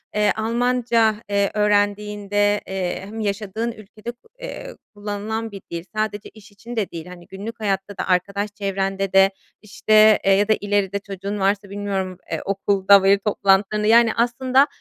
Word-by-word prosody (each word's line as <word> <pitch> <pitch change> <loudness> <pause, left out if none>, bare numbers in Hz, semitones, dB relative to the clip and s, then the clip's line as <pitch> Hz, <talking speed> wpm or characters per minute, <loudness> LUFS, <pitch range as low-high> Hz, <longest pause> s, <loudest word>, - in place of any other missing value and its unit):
eee, 210 -1 +3
Almanca, 230 0 +1
eee, 200 -1 +1
öğrendiğinde, 205 0 +1
eee, 190 -2 -3
hem 215 +3 -8
yaşadığın 215 +2 -2
ülkede 215 +1 -9
ko 240 - -27
eee, - - -8 0.2
kullanılan 210 +2 -4
bir 195 -1 -9
dil, 170 -1 -4
sadece 215 -1 -2
iş 210 -2 -17
için 230 +4 -10
de 215 -4 -2
değil, 165 -1 -7
hani, 180 -1 -12
günlük 220 +4 -8
hayatta 195 -1 -2
da, - - -3
arkadaş 200 +3 0
çevrende 195 -1 -2
de 195 0 +6 0.3
işte, 215 0 +4
eee, 195 - +4
ya 200 +1 +3
da 220 - +4
ileride 200 -1 0
çocuğun 200 +1 -6
varsa 200 +1 0
bilmiyorum, 195 -2 -3
eee, - - -2
okulda 195 0 +3
veli 195 +1 +4
toplantılarında, 205 +1 +1
yani 230 0 +5
aslında, 255 +4 +2
205 Hz, 160 wpm, -21 LUFS, 195-220 Hz, 0.3 s, de